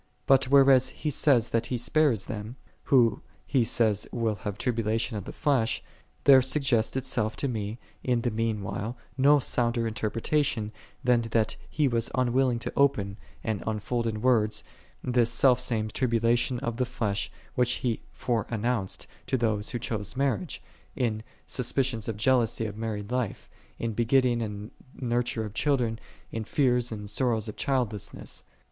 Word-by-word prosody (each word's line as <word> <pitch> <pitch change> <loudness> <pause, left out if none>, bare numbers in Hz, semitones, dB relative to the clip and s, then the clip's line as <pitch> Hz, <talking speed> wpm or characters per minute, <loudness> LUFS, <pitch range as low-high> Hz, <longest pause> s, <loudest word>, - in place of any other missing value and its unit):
But 135 -1 +5
whereas 135 -1 +6
he 150 +3 -3
says 130 -5 +3
that 115 0 0
he 125 - -1
spares 125 -3 +2
them, 110 0 -6 0.3
who 120 -6 +4 0.2
he 130 -4 +2
saith 110 -3 +2
will 115 -2 0
'have 105 -1 -5
tribulation 115 -1 -1
of 100 - -4
the - - -6
flesh, 125 -6 +1 0.4
there 135 -2 +8
suggests 130 -4 +1
itself 125 -4 0
to 140 - -2
me 110 -3 -3 0.3
in 125 -2 +1
the 120 - 0
mean 110 -1 -1
while 100 +5 -4 0.2
no 140 +3 +5
sounder 120 -3 +1
interpretation, 115 +1 0 0.3
than 125 -2 +4
that 110 -1 +1
he 150 -2 +1
was 115 -2 0
unwilling 125 0 +2
to 115 - -5
open, 105 -8 +2 0.3
and 110 -4 -2
unfold 115 +2 -1
in 110 0 -3
words, 110 -4 +2 0.4
this 120 -2 +2
self 125 +1 +4
same 110 -3 -1
tribulation 120 +1 +1
of 115 -1 -3
the 125 - +1
flesh, 105 -5 -2 0.2
which 125 0 +2
he 120 -3 -2
fore 115 -4 -1
announced 115 -3 -2 0.2
to 130 - +1
those 110 -3 0
who - - -2
choose 110 0 -4
marriage, 130 -9 -1 0.3
in 110 -4 -1 0.2
suspicions 125 -2 -1
of 110 -3 -3
jealousy 115 -1 +2
of 105 -1 -5
married 110 -1 -4
life, 120 -2 -3 0.3
in 115 - -2
the 105 - -10
begetting 120 0 +3
and 105 -1 -5 0.3
nurture 120 -2 -1
of 105 - -7
children, 120 -5 +1 0.3
in 115 - -3
fears 125 0 +1
and 105 -2 -6
sorrows 115 -2 0
of 110 - -6
childlessness. 125 -7 -2
115 Hz, 160 wpm, -27 LUFS, 110-125 Hz, 0.4 s, there